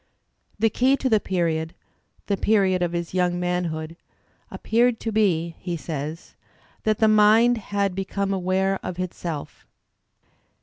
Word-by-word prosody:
"The 220 +1 +2
key 265 +5 +3
to 265 - -1
the 220 -2 +4
period" 165 -4 -1 0.3
— - - -40
the 200 - 0
period 195 -2 +2
of 175 -1 0
his 170 0 -4
young 180 -1 +1
man 180 0 -1
hood 160 0 -5 0.3
— - - -39
"appeared 235 +1 +1
to 225 - -2
be," 170 -6 +1
he 175 -2 -4
says, 155 0 -6 0.5
"that 215 -1 +2
the 220 - +3
mind 215 +3 +5
had 200 -2 -1
be 195 +1 -2
come 200 +1 -2
aware 190 +1 0
of 180 - -6
itself." 175 -4 -6
185 Hz, 160 wpm, -24 LUFS, 170-215 Hz, 0.5 s, mind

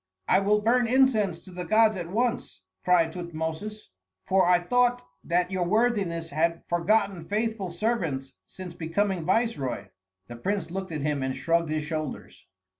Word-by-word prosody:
"I 185 - +5
will 210 +2 +2
burn 240 +2 +3
incense 225 -8 +2
to 185 - -14
the 180 0 -5
gods 215 +4 +4
at 175 -2 -5
once," 225 - -2 0.2
cried 170 -3 +3
Tutmosis, 170 - -5 0.3
"for 190 -1 +3
I 180 0 +6
thought 245 +6 +1 0.2
that 180 +1 0
your 185 -1 0
worthiness 190 -5 0
had 165 +3 0
forgotten 180 +1 +1
faithful 210 0 -2
servants 170 - -2
since 185 -2 -9
becoming 175 +2 -1
viceroy." 165 - 0 0.4
The 120 +3 -9
prince 180 +4 -2
looked 190 0 -4
at 155 -2 -3
him 145 -1 -1
and 130 0 -2
shrugged 165 +2 +1
his 155 0 -1
shoulders. 155 -2 -6
180 Hz, 155 wpm, -27 LUFS, 165-215 Hz, 0.4 s, I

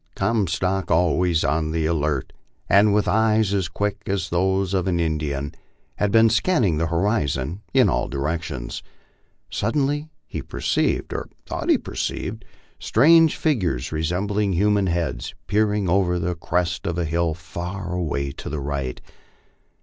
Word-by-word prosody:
Comstock, 95 -3 0
always 85 0 +2
on 80 0 0
the 80 0 -1
alert 75 -4 -1 0.3
and 100 +3 +5
with 105 0 +2
eyes 110 -1 +3
as 95 -3 +1
quick 100 +3 -2
as 100 0 -1
those 95 +2 +1
of 95 -2 0
an 85 -2 +1
Indian, 75 -3 -2 0.4
had 105 -1 +1
been 115 +1 +6
scanning 110 - +2
the 85 - +1
horizon 85 - 0
in - - +5
all - - 0
directions. 70 -3 -3 0.7
Suddenly 145 +6 0 0.2
he - - -5
perceived, - - -1
or - - -4 0.2
thought - - -4
be - - +5
perceived, - - -4 0.4
strange 160 +6 +5
figures, 90 - 0
resembling 95 +6 0
human 100 +2 +2
heads, 80 -9 -2
peering 105 -1 +1
over 90 0 +2
the 90 +1 -1
crest 85 +2 -1
of 85 -1 -2
a 85 - 0
hill 85 0 0
far 90 +2 -6
away 70 -6 -2
to - - -8
the 75 - -3
right. 70 -2 -3
90 Hz, 140 wpm, -23 LUFS, 80-105 Hz, 0.7 s, been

